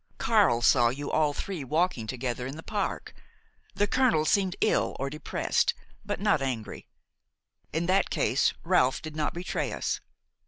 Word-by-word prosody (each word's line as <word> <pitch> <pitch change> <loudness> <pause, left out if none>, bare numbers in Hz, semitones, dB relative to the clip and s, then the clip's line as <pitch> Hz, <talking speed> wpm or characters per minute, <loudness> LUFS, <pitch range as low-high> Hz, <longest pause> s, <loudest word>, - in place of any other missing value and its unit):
Carle 200 - +3
saw 120 -2 +5
you 140 +4 -4
all 155 -2 +2
three 170 +1 -5
walking 155 -4 0
together 125 0 -3
in 135 - -6
the 160 - -9
park. 205 -2 -3 0.6
The 205 - +2
colonel 230 -10 +2
seemed 190 +2 +2
ill 215 - +1
or 135 +1 -2
depressed, 150 0 0 0.3
but - - -3
not 200 -7 +2
angry. 125 -5 -4 0.8
In 165 +2 -1
that 190 +2 +2
case - - +2
that - - -9
Ralph 130 +1 +2
did 155 -1 -7
not 155 0 -1
betray 175 +1 -2
us! - - -2
155 Hz, 160 wpm, -28 LUFS, 130-185 Hz, 0.8 s, saw